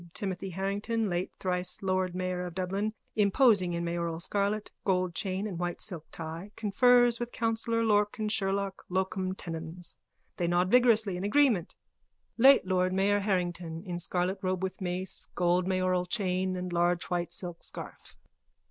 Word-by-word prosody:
Timothy 195 -1 -3
Harrington, 200 +3 -2
late 175 +1 -2
thrice 180 0 -1
Lord 185 -1 0
Mayor 185 -1 -2
of 175 - -9
Dublin, 195 +4 -2 0.2
imposing 205 -3 +4
in 170 0 -2
mayoral 170 -1 -2
scarlet, 205 +3 -1
gold 185 -2 +1
chain 190 +2 -2
and 190 -5 -4
white 175 -1 -2
silk 175 -7 -2
tie, 165 +4 -6
confers 240 +3 +4
with 240 0 -4
councillor 230 0 0
Lorcan 210 0 +1
Sherlock,_ 195 -2 -1
locum 185 0 -1
tenens. 165 0 -6 0.4
They 175 - 0
nod 175 +2 +2
vigorously 225 -6 +4
in 180 - -4
agreement.) 210 - +2 0.6
LATE 270 -3 +7
LORD 185 0 +1
MAYOR 200 +2 +2
HARRINGTON: 175 -4 -2
_(In 175 -1 -3
scarlet 180 +2 -1
robe 185 -1 -1
with 190 +1 -4
mace, 185 +1 -3
gold 180 +1 +2
mayoral 185 -1 +1
chain 185 -2 0
and 180 -1 -4
large 175 0 +2
white 175 -1 -1
silk 175 -1 -4
scarf.) - - -8
185 Hz, 150 wpm, -29 LUFS, 180-205 Hz, 0.6 s, LATE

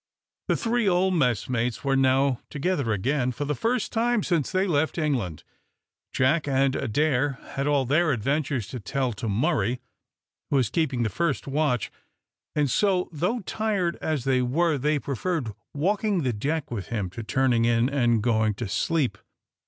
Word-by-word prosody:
The - - +2
three 235 -2 +1
old 185 +1 +2
messmates 125 - 0
were 135 -1 +1
now 135 -1 +3
together 145 -5 -1
again, 125 +5 0
for 145 +4 -4
the 150 - -1
first 230 - -1
time 235 -1 +1
since 165 -6 0
they 185 +1 +2
left 160 -3 0
England. 125 - -1 0.7
Jack 145 +4 +2
and 135 -1 +2
Adair 140 +2 +1 0.2
had 135 +1 -1
all 145 -2 +2
their 155 +5 +3
adventures 135 0 -1
to 125 - -5
tell 125 +4 -1
to 110 +2 -4
Murray, 110 +2 +1 0.7
who - - +1
was 130 -6 +2
keeping 140 -7 0
the 110 - 0
first 155 - -1
watch, 140 -5 0 0.6
and 150 -1 +2
so, 185 - +1
though 180 +10 -1
tired 200 -4 -1
as 155 -5 -2
they 130 -1 +2
were, 150 +4 +1
they 150 +3 +1
preferred 140 - -2 0.2
walking 195 +3 0
the 125 -2 0
deck 140 +8 -2
with 100 -6 -4
him 100 -6 -3
to 115 - -6
turning 120 0 +2
in 115 0 +3
and 120 -6 +2
going 110 -3 +2
to 115 +1 -4
sleep. 130 - 0
140 Hz, 165 wpm, -26 LUFS, 120-165 Hz, 0.7 s, now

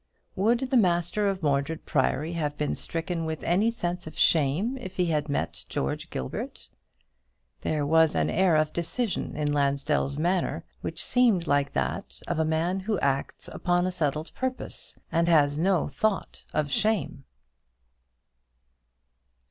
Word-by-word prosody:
Would 235 +6 +1
the 260 - +5
master 180 +1 +2
of 190 -3 -3
Mordred 145 +2 0
Priory 150 +3 0
have 150 -3 -2
been 150 - -1
stricken 165 0 -2
with 160 -1 -4
any 195 +7 +3
sense 180 -7 -3
of 155 - -9
shame 165 - +3
if 190 -6 -8
he 180 - +2
had 155 -3 0
met 140 - -1
George 70 - -3
Gilbert? 65 - -5 0.9
There 150 -2 0
was 160 +1 +4
an - - +2
air 185 -2 +3
of 155 0 +2
decision 180 +6 -2
in 150 -1 0
Lansdell's 140 0 +1
manner 175 +3 0 0.2
which - - -3
seemed 230 -9 +3
like 140 -2 +1
that - - -2
of - - -1
a - - +3
man 165 +4 0
who 205 +2 -1
acts 140 0 -1
upon 175 0 +1
a 185 - 0
settled 155 -2 -2
purpose, 260 0 -5
and 170 0 +2
has 150 -3 +4
no 185 -1 +2
thought 195 +8 -2
of 150 -2 -1
shame. 195 -8 0
165 Hz, 150 wpm, -27 LUFS, 150-185 Hz, 0.9 s, the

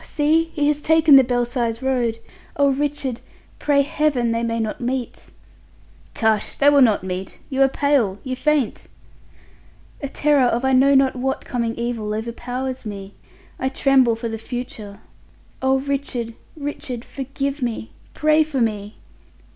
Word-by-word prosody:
see 315 +2 +2
he 295 -2 +1
has 295 0 +1
taken 320 -2 +5
the 270 - +8
Belsize 240 -1 -1
Road. 245 -4 0 0.4
Oh, 280 -1 +4
Richard, 275 -3 -2 0.4
pray 280 -1 +3
Heaven 280 -5 0
they 230 0 0
may 230 0 -1
not 220 +1 -3
meet." 250 0 -4 0.9
"Tush! 220 -2 +1
They 285 +1 +5
will 285 -1 +5
not 220 -6 +4
meet! 185 0 -5
You 270 0 0
are 270 - +7
pale, 270 -8 +1
you 260 -1 -3
faint!" 290 -3 0 1.1
"A 280 - -4
terror 290 -2 +3
of 240 +2 0
I 265 - +2
know 275 +2 +5
not 270 -1 +3
what 265 +1 -2
coming 235 -2 -2
evil 230 -3 -3
overpowers 245 +3 -4
me. 200 -2 -7 0.5
I 260 - 0
tremble 265 -3 +3
for 230 +1 -5
the 225 -1 -5
future. 225 -4 -7 0.6
Oh, 265 0 +3
Richard, 265 -4 -3 0.2
Richard! 280 -4 -5
Forgive 275 +1 -4
me! 230 -2 -3 0.2
Pray 305 0 +3
for 300 -3 -3
me." 210 -3 -2
255 Hz, 150 wpm, -21 LUFS, 230-280 Hz, 1.1 s, the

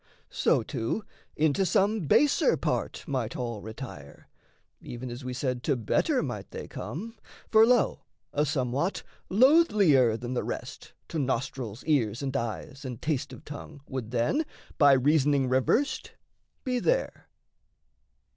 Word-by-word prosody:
So, - - +2
too, 115 - -3 0.3
Into 155 +4 +2
some 195 0 +1
baser 295 - +4
part - - -2
might 130 -5 -2
all 120 -4 -4
retire, 110 - -9 0.5
Even 120 +1 -7
as 120 +3 -7
we 125 - -4
said 125 -1 -2
to 145 - +2
better 115 -4 +1
might - - -5
they - - -7
come: 225 +7 -7 0.3
For, 220 0 +7
lo, 245 -1 +3 0.3
a 145 - +2
somewhat, 140 +4 -1 0.3
loathlier 200 - +5
than 125 +1 -4
the 125 - -1
rest - - -6 0.2
To 160 - -2
nostrils, 130 -4 -2
ears, 130 -6 +1
and 135 0 -3
eyes, 130 +3 -4
and 125 -4 -6
taste 150 -4 -2
of - - -12
tongue, 145 0 -9
Would 130 -4 -5
then, 120 - +1 0.4
by 145 -3 +7
reasoning 140 0 +3
reversed, 130 - +1 0.5
be 250 -1 0
there. - - -1
135 Hz, 135 wpm, -28 LUFS, 125-175 Hz, 0.5 s, For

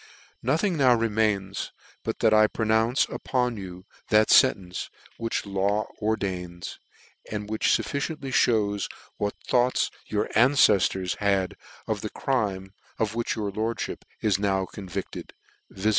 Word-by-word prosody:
<c - - -21 0.4
Nothing 165 - +1
now 130 -4 +5
remains, 105 -4 0 0.3
but - - -4
that 110 - +5
I 110 0 +6
pronounce 110 +3 +2
upon 125 -2 -1
you 90 -1 -8 0.2
that 110 0 +4
fentence 95 -8 +3 0.3
which 115 0 -2
the 100 - -10
law 100 +2 0
ordains, 95 -5 -3 0.5
and 105 -1 -3
which 110 0 -1
fufficiently 140 -2 -1
mews 105 -3 +1 0.3
what 105 0 -2
thoughts 125 +1 +2 0.2
your 105 -1 0
anceftors 105 -8 +4
had 100 -2 +1 0.3
of - - -2
the - - -4
crime 100 -7 -2 0.2
of 110 -1 0
which 120 0 -1
your 105 -3 -2
lordfhip 110 +3 -3 0.2
is 100 -3 +2
now 95 -2 +1
convicted, 95 -1 -7 0.4
viz. 95 +3 -1
105 Hz, 135 wpm, -26 LUFS, 95-115 Hz, 0.5 s, I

